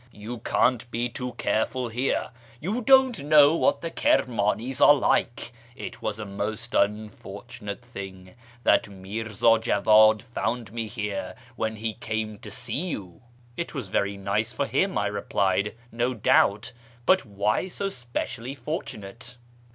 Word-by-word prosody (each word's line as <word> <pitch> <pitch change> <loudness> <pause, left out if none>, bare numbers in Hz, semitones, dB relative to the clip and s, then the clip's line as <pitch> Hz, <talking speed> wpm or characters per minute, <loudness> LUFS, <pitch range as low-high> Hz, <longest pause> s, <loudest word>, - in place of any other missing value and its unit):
You 115 +3 -7
can't 120 +1 +1
be 120 +1 -1
too 125 +1 -5
careful 120 +3 -1
here. 125 +2 -1 0.3
You 205 - -2
don't 260 - +5
know 150 +1 +6
what - - +2
the 165 - -4
Kirmanis 125 - +1
are 145 - +9
like. 120 -3 0 0.2
It - - -8
was 105 -1 -2
a 110 - -5
most 105 +4 -4 0.4
fortunate 100 +2 -8
thing 95 -6 -9 0.3
that - - +3
Mirza 110 +3 +1
Jawad 110 -1 +5
found 120 -3 -3
me 115 -1 -3
here 105 -2 -4 0.2
when 110 -2 -2
he 110 0 -3
came 110 -2 -4
to 105 - -9
see 145 - -3
you." 90 - -7 0.2
" 120 0 -29
It 170 +1 -5
was 125 -9 -4
very 100 +1 0
nice 100 +3 -1
for 130 +5 -1
him," 190 +6 0
I - - +1
replied, 100 0 0
" 120 - -28
no 120 +2 -1
doubt. 105 +1 +3 0.3
But 185 0 +4
why 105 - 0
so 195 +2 -3
specially 120 -3 -5
fortunate 120 - -6
115 Hz, 150 wpm, -26 LUFS, 105-125 Hz, 0.4 s, are